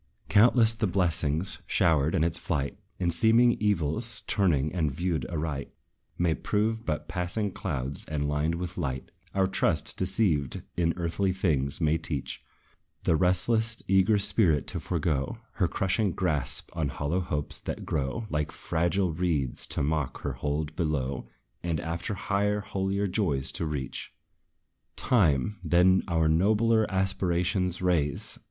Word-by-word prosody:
Countless 115 +2 +5
the 110 -1 -1
blessings 85 -2 +1
showered 80 0 +2
in 80 - +2
its 85 0 +10
flight; 70 -4 -2 0.2
And 85 -2 +1
seeming 115 +6 +5
evils, 105 +4 0
turned 75 -8 +1
and 80 -5 0
viewed 80 -3 -2
aright, 75 -4 -4 0.5
May 85 -2 +2
prove 110 +5 -1
but 75 -1 -2
passing 90 +4 -2
clouds, 70 -7 -4
and 75 -2 -2
lined 75 +3 0
with 90 +1 -5
light. 65 -5 -4 0.2
Our 95 -1 +3
trust, 95 -1 +1
deceived 90 - +1
in 85 -1 0
earthly 90 +3 0
things, 75 -8 0
may 80 -1 +1
teach 75 -4 -4 0.6
The 80 - +2
restless, 110 +7 +2
eager 95 +3 +4
spirit 90 -7 +2
to - - -3
forego 75 -5 -2 0.2
Her - - +2
crushing 95 0 0
grasp 80 -7 -2
on 80 -3 -1
hollow 75 +5 -2
hopes, 75 -5 -3
that - - -6
grow 70 +10 -2
Like 75 -1 -1
fragile 85 +2 -1
reeds, 80 -7 0
to - - 0
mock 75 -2 -2
her 70 - -3
hold 75 +3 -3
below; 70 -6 -2 0.3
And 85 -3 -2
after 85 +5 -4
higher, 105 +1 0
holier 100 0 -2
joys 75 -10 0
to 85 - -1
reach. 70 -4 -5 0.8
TIME, 95 - +2
then 90 +3 +4
our 80 -3 +1
nobler 110 +7 +2
aspirations 90 -1 0
raise! 80 -6 -1
85 Hz, 140 wpm, -27 LUFS, 75-95 Hz, 0.8 s, its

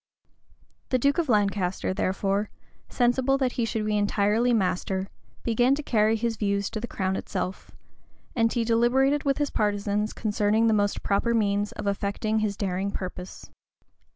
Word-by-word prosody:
The 255 - +2
duke 280 +6 +2
of 325 -5 -1
Lancaster, 200 -4 +1
therefore, 195 +2 -1 0.4
sensible 255 +2 +2
that 260 -2 0
he 235 - -1
should 220 -1 -2
be 215 0 0
entirely 210 +4 +2
master, 190 -2 0 0.3
began 245 +3 +3
to 300 - -5
carry 220 -3 +2
his 225 0 -2
views 200 -1 -1
to 215 - -3
the 240 - -5
crown 190 -3 -2
itself; 185 -1 -4 0.7
and 230 -2 +2
he 235 - 0
deliberated 255 +5 +2
with 275 -1 +2
his 290 -1 -1
partisans 205 0 0
concerning 215 +1 +1
the 225 - +4
most 205 -1 0
proper 235 +4 +1
means 205 -1 +1
of 210 - -6
effecting 200 +2 -1
his 210 -2 -1
daring 195 0 -1
purpose. 185 -1 -7
215 Hz, 155 wpm, -26 LUFS, 200-235 Hz, 0.7 s, the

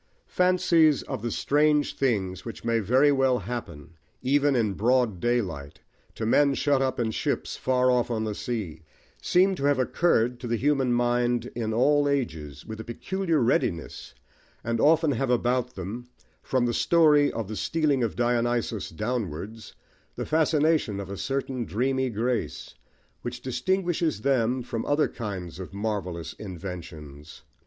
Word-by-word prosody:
Fancies 170 -4 +3
of - - -5
the 120 - -2
strange 150 +4 +2
things 95 -8 -1
which 115 0 -8
may 115 -1 +2
very 130 +8 +4
well 135 -2 +3
happen, 85 -12 -7 0.3
even 140 +1 +3
in 110 -5 +1
broad 120 -2 +1
daylight, 90 -13 -2 0.4
to 110 - -3
men 140 +4 +3
shut 140 -2 +2
up 130 -1 0
alone 115 -2 0
in - - -2
ships - - -2
far 130 0 +2
off 125 -1 +1
on 110 -2 -1
the 110 -1 -2
sea, 100 -9 -4 0.4
seem 190 +2 +3
to 140 -7 -3
have 145 -1 +3
occurred 125 -3 +1
to 120 - -6
the 115 - 0
human 135 0 +1
mind 120 0 +1
in 115 -2 -2
all 145 +5 +3
ages 80 - -3
with 110 -1 -7
a - - -5
peculiar 165 - -1
readiness, 85 - -1 0.5
and 115 0 -1
often 160 0 +4
have 135 0 -1
about 125 0 0
them, 105 +7 -6 0.3
from 130 -2 0
the 120 - 0
story 150 -1 +4
of 115 -4 -4
the 110 - -5
stealing 150 0 0
of 115 -3 -1
Dionysus 120 -2 0
downwards, 105 0 -4 0.4
the - - -4
fascination 155 -8 +2
of 100 -1 -6
a - - -4
certain 130 +4 -2
dreamy 130 +4 0
grace, 120 +2 -2 0.5
which 120 0 -5
distinguishes 165 - -1
them 125 -1 +1
from 115 -2 -4
other 145 +1 +2
kinds 95 -7 -6
of 95 +1 -8
marvellous 90 -6 -3
inventions. 80 -6 -9
120 Hz, 155 wpm, -26 LUFS, 105-140 Hz, 0.5 s, very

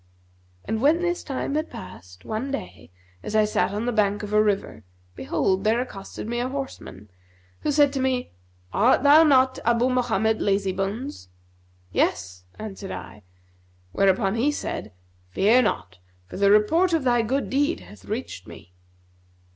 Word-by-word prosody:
And 220 0 -2
when 315 +6 +3
this 350 0 -1
time 275 0 -3
had 310 +2 -1
past, 90 0 -11
one 220 +5 -3
day, 95 - -6 0.3
as 215 - -5
I 215 -1 +5
sat 210 - 0
on 210 +3 -3
the 245 - 0
bank 210 -2 +1
of 210 0 -5
a 210 - +5
river, 205 - -1 0.3
behold, 140 - 0
there 220 +2 +2
accosted 205 -4 -6
me 240 +1 -2
a 250 +1 -1
horseman, 260 - -7 0.5
who 300 - -1
said 290 -1 +4
to 275 - -2
me, 260 -1 -1 0.4
'Art 245 +4 +3
thou 290 +2 +8
not 265 -4 +4
Abu 235 +2 +2
Mohammed 220 -4 +1
Lazybones?' 195 - -2 0.6
'Yes,' 90 0 -1
answered 200 -2 -7
I; 105 - -8 0.7
whereupon, 195 - +2
he 245 +6 +1
said, 110 - -5 0.4
'Fear 215 - +4
not, 95 - -2 0.3
for - - -9
the 200 0 +4
report 320 - +4
of 320 -4 +1
thy 240 -2 +3
good 265 +5 -2
deed 275 - +1
hath 95 +2 -15
reached - - -6
us.' - - -9
220 Hz, 155 wpm, -24 LUFS, 195-260 Hz, 0.7 s, thou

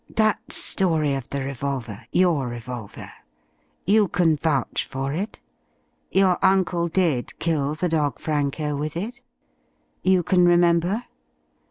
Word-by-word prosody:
That 215 -1 +1
story 160 -6 +2
of 135 -3 -4
the 140 - -3
revolver 135 -5 -5
your 170 -8 +2
revolver. 120 -2 -7 0.7
You 210 +1 +4
can 170 -3 +2
vouch 145 -4 0
for 135 +1 -4
it? 195 +7 -4 0.7
Your 190 -2 +3
uncle 180 -3 +2
did 165 -7 0
kill 150 -3 0
the 180 +3 -1
dog 150 -3 0
Franco 150 0 -1
with 150 +3 -3
it? 220 +8 -5 0.8
You 185 -1 +3
can 180 +1 +4
remember? 175 +5 +3
160 Hz, 125 wpm, -23 LUFS, 140-180 Hz, 0.8 s, You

